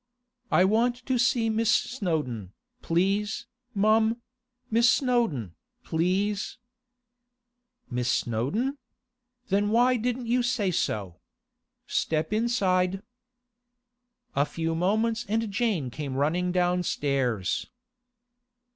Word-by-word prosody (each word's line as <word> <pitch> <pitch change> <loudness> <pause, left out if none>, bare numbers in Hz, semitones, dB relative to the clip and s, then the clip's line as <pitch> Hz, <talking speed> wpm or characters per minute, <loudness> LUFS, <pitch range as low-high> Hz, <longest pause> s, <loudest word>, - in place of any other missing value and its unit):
'I 180 - +5
want 240 +5 +1
to 260 -2 0
see 235 -1 +2
Miss 220 0 +1
Snowdon, 155 - -1 0.3
please, 200 +6 0 0.3
mum—Miss 235 +3 +1
Snowdon, 230 - +1 0.3
please—' 195 +5 0 1.3
'Miss 125 -1 -1
Snowdon? 200 - -1 0.7
Then 200 +1 +2
why 245 +3 +4
didn't 245 +2 -2
you 245 +2 +2
say 240 -6 0
so? 100 - -2 0.7
Step 160 +4 -1
inside.' 195 -5 +1 1.3
A 140 - +4
few 165 0 -2
moments 220 +7 +1
and 220 0 0
Jane 195 - 0
came 140 -1 -5
running 170 +6 +1
downstairs. 145 - 0
200 Hz, 90 wpm, -27 LUFS, 160-235 Hz, 1.3 s, I